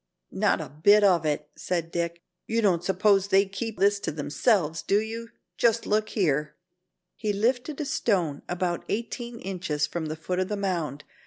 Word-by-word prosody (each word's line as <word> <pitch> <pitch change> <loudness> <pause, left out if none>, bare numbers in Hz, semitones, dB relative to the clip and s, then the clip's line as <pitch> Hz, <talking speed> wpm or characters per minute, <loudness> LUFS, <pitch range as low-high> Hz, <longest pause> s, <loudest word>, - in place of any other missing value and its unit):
"Not - - +2
a - - -6
bit 205 +9 +5
of 175 -6 +4
it," 150 0 -2
said 170 -2 -2
Dick. 170 0 -3 0.2
"You 225 0 0
don't 175 -4 +3
suppose 195 +1 +3
they 195 0 +4
keep 200 +3 -5
this 200 +2 +3
all - - -27
to - - -1
themselves, 160 - +1
do 200 - +2
you? 225 +1 -5 0.3
Just 230 -1 +2
look 215 +1 +1
here." 150 -6 0 0.6
He 215 -2 -1
lifted 245 +7 0
a 300 - -2
stone 180 - 0
about 175 -1 -1
eighteen 235 +2 -4
inches 175 -6 -2
from 160 +1 -4
the 155 - -3
foot 180 +3 -3
of 185 - 0
the 210 - -3
mound. 170 -8 -2
190 Hz, 180 wpm, -26 LUFS, 165-215 Hz, 0.6 s, bit